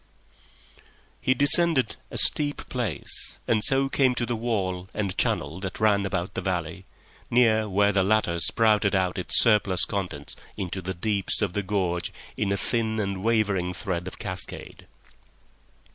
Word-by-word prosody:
He 130 - +2
descended 145 -2 +4
a - - -6
steep 145 -1 +2
place, 120 -5 -1
and 110 -2 +1
so 135 +4 +2
came 130 -2 +2
to 120 - -1
the 120 0 -2
wall 95 -5 -2
and 100 -3 -2
channel 80 +6 -1
that 95 -1 -6
ran 100 -2 +2
about 85 -1 -3
the - - -3
valley, 90 -1 -3 0.4
near 110 -3 +3
where 100 +1 +3
the 100 -1 +2
latter 95 -4 +1
spouted 105 +1 +2
out 95 -1 0
its 90 - +3
surplus 105 -5 +3
contents 90 -8 -5 0.2
into 95 0 -4
the 95 +1 -5
deeps 100 +2 -1
of 95 -4 -1
the 105 - -1
gorge 90 -3 -2 0.2
in 100 -2 -1
a 100 - +1
thin 110 +1 -1
and 100 -2 -3
wavering 100 -6 0
thread 90 -2 -4
of - - -8
cascade. - - -7
100 Hz, 155 wpm, -25 LUFS, 95-110 Hz, 0.4 s, descended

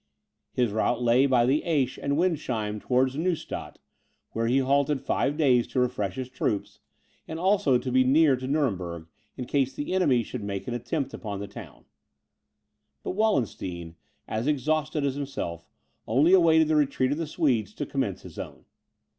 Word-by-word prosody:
His 120 -4 0
route 115 +3 0
lay 120 +3 +4
by 125 -3 +3
the 140 +5 +2
Aisch 145 -7 0
and 140 +1 0
Windsheim 125 - -1
towards 130 +3 +1
Neustadt, 165 +2 -3 0.5
where 115 0 -1
he 125 +3 +3
halted 140 +1 +2
five 145 +3 -1
days 130 -6 +3
to - - -2
refresh 120 -7 -1
his 130 -1 -4
troops, 115 -5 -3 0.5
and 160 - -5
also 185 -6 +3
to 125 +1 -4
be 130 +1 +4
near 140 +2 +4
to 130 0 -6
Nuremberg, 95 - -1 0.3
in 125 - -4
case 135 0 0
the 145 - -3
enemy 140 -11 +3
should 120 -1 -6
make 100 -1 -4
an 120 - -2
attempt 130 +5 -3
upon 100 -3 -5
the 100 - -5
town. 100 - -12 1.2
But - - -3
Wallenstein, 100 - -1 0.3
as 110 +5 -2
exhausted 150 +1 0
as 140 - 0
himself, 130 - -5 0.4
had 110 - -4
only 150 +9 +5
awaited 160 -3 +5
the 155 - +2
retreat 135 -3 +2
of 145 - -1
the 165 - -2
Swedes 125 - 0
to - - -3
commence 130 -9 -3
his - - -10
own. - - -8
130 Hz, 170 wpm, -26 LUFS, 115-150 Hz, 1.2 s, only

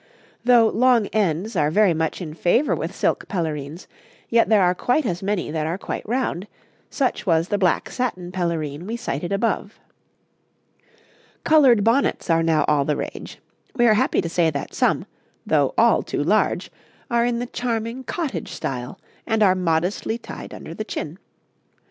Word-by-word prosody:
Though 240 -2 +6
long 245 -2 +3
ends 205 0 0
are 150 - +2
very 200 +2 +4
much 160 +3 -2
in 155 -3 -7
favour 180 - +2
with - - -5
silk - - 0
pelerines, 160 -3 -4 0.4
yet 230 0 +3
there 210 -3 +5
are 180 0 +3
quite 250 +10 0
as 175 -5 -2
many 195 -5 -2
that 155 -1 -2
are 170 +3 -2
quite - - -5
round; 230 -6 -1 0.4
such 260 -6 -1
was 165 0 +2
the 205 - 0
black 180 -4 +1
satin 185 -9 -3
pelerine 170 -3 -3
we 230 +2 -3
cited 175 - -4
above. 205 0 -1 1.6
'Coloured 265 -9 +5
bonnets 230 -5 +1
are 165 0 +3
now 160 -2 +2
all 150 -2 +3
the 150 +1 -1
rage; - - -6 0.4
we 240 -2 +3
are 225 - +6
happy 215 - +2
to - - -4
say 165 0 +2
that 140 -2 -5
some, - - +1 0.4
though - - +1
all - - +4
too - - -3
large, - - +1 0.4
are 235 0 +3
in 240 0 0
the 245 - -2
charming 235 0 -3
cottage 260 - -4
style, 125 +7 -5 0.3
and 220 -1 +2
are 190 -2 +5
modestly 180 +5 -1
tied - - -9
under - - -9
the - - -4
chin. - - -6
190 Hz, 165 wpm, -22 LUFS, 165-235 Hz, 1.6 s, Though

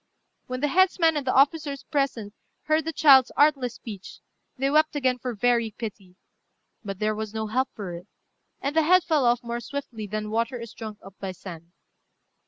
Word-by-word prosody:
When 255 0 -4
the 295 - +2
headsman 345 -1 +3
and 285 -3 -3
the - - +1
officers 280 0 +2
present 270 -9 -2 0.3
heard 310 0 +1
the 325 - -1
child's 270 -5 +6
artless 275 -5 +3
speech, 200 -4 -9 0.4
they 270 +2 0
wept 310 +1 +3
again 255 -3 +1
for 245 -1 -4
very 235 0 +1
pity; 200 -5 -7 0.7
but 195 -2 -5
there 215 +1 0
was 215 0 -5
no 220 0 -2
help 255 +5 0
for 195 -5 -6
it, 175 +3 -9 0.5
and 280 +2 -2
the 320 - +5
head 360 +3 +5
fell 305 -6 +1
off 240 +1 +2
more 235 0 -3
swiftly 240 -4 -6
than 215 +1 -4
water 230 +2 -1
is 230 -1 -9
drunk 215 -2 -8
up 195 - -12
by 190 -1 -5
sand. 170 -2 -11
245 Hz, 190 wpm, -25 LUFS, 215-285 Hz, 0.7 s, child's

